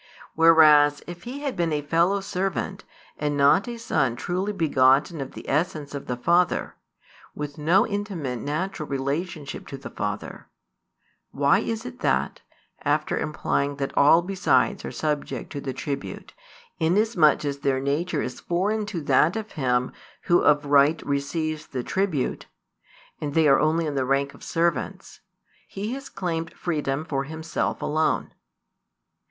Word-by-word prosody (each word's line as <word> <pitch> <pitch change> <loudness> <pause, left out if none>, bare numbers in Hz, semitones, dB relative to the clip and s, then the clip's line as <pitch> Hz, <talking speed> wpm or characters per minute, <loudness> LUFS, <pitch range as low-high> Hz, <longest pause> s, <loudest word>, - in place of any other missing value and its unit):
Whereas 155 -3 +6
if 175 0 -9
He 265 +4 -6
had 280 -3 -3
been 170 -2 0
a 150 -1 -1
fellow 170 +6 +2
servant, 195 0 -3 0.3
and 145 -1 -1
not 145 - +4
a 240 -1 -5
Son 130 - 0
truly 185 +9 -2
begotten 145 -3 +3
of 135 - -6
the - - -10
essence 150 -1 -1
of 140 - -6
the 125 - -2
Father, 170 +7 +2 0.6
with 145 0 -6
no 170 +6 +4
intimate 195 - -3
natural 155 +4 -3
relationship 140 +3 -3
to 135 - -7
the 135 - -9
Father; - - -5 0.8
why 140 0 +3
is 225 +1 -3
it 250 0 -8
that, - - 0 0.4
after - - 0
implying 145 -1 -1
that 140 -1 -4
all 160 +4 +6
besides 195 +1 +1
are - - -5
subject 150 -2 -3
to 145 - -5
the 135 - -3
tribute, 140 +1 -6 0.5
inasmuch 175 -2 +3
as 140 -1 -2
their 135 -2 +1
nature 150 +4 -1
is 125 - -5
foreign 205 +5 -1
to 180 -6 -4
that 145 +4 +3
of 220 -1 -5
Him 125 -5 0 0.3
Who 175 - +4
of 145 0 +3
right 145 +2 +4
receives 155 +2 -2
the 125 -2 -4
tribute, 185 -7 -1 0.7
and 145 -2 -4
they 160 -2 +5
are 135 -1 +5
only 160 +2 +2
in 150 - -2
the 135 -2 0
rank 140 +1 0
of - - -15
servants, 165 -5 -2 0.5
He 210 +5 -4
has 275 0 -7
claimed 165 -5 -4
freedom 150 -3 -2
for 135 -3 -2
Himself 160 +2 -3
alone? 155 +1 0
155 Hz, 150 wpm, -25 LUFS, 140-180 Hz, 0.8 s, Whereas